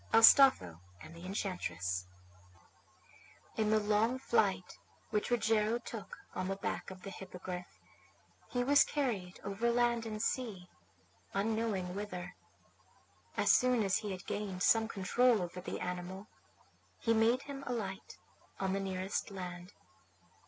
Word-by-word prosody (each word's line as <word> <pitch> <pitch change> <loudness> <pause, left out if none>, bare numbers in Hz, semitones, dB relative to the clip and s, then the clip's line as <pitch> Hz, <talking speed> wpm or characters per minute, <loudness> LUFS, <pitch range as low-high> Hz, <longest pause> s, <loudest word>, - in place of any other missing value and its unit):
ASTOLPHO 225 - +7 0.2
AND 160 - -11
THE 170 +2 -9
ENCHANTRESS 90 - -2 1.5
In 215 -1 +1
the 215 0 +4
long 215 +4 +2
flight 195 - 0 0.3
which 210 -1 0
Rogero 225 -1 +2
took 230 -3 -8 0.2
on 185 +1 -2
the 195 - -1
back 195 - -4
of 185 -1 -11
the 195 - -6
Hippogriff 180 -1 -8 0.7
he 245 -1 -1
was 285 +3 +6
carried 215 -11 -2
over 200 +4 0
land 235 -1 +2
and 215 -1 -4
sea, 215 -6 -2 0.7
unknowing 205 -3 0
whither. 180 -3 -5 1.0
As - - +4
soon 250 -3 +4
as 195 -1 +2
he 210 -2 -4
had 185 -1 -6
gained 195 -3 -3
some 225 -1 +4
control 230 +4 +3
over 180 0 -5
the - - -5
animal 180 +2 -5 0.7
he 230 - +1
made 230 +3 +3
him 275 -1 -7
alight 205 -6 -4 0.4
on 190 -1 0
the 195 - 0
nearest 190 +1 -2
land. 180 -1 -7
200 Hz, 130 wpm, -34 LUFS, 185-230 Hz, 1.5 s, ASTOLPHO